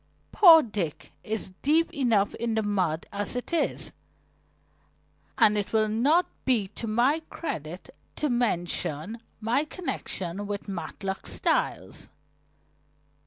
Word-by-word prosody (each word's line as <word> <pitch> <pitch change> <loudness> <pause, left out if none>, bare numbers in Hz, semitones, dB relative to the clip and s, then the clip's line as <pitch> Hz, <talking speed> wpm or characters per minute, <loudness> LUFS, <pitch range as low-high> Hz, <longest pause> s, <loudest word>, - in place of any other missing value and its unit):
Poor 330 -6 +8
Dick 195 -9 -4
is 215 -3 -3
deep 325 +4 +2
enough 230 - +2
in 230 -1 -2
the 220 - +1
mud 185 -6 0
as 205 +3 -2
it 250 +7 -4
is, 335 - 0 1.4
and 210 - +5
it 205 - -5
will 215 -1 +3
not 275 +11 +3 0.2
be 235 -7 +2
to 230 - -6
my 245 +8 +2
credit 175 - -6 0.2
to 305 - 0
mention 205 - -1 0.2
my 235 +6 +1
connection 205 - -4
with 205 0 -5
Matlock 195 +1 -5
Styles." - - -1
220 Hz, 120 wpm, -27 LUFS, 195-260 Hz, 1.4 s, Poor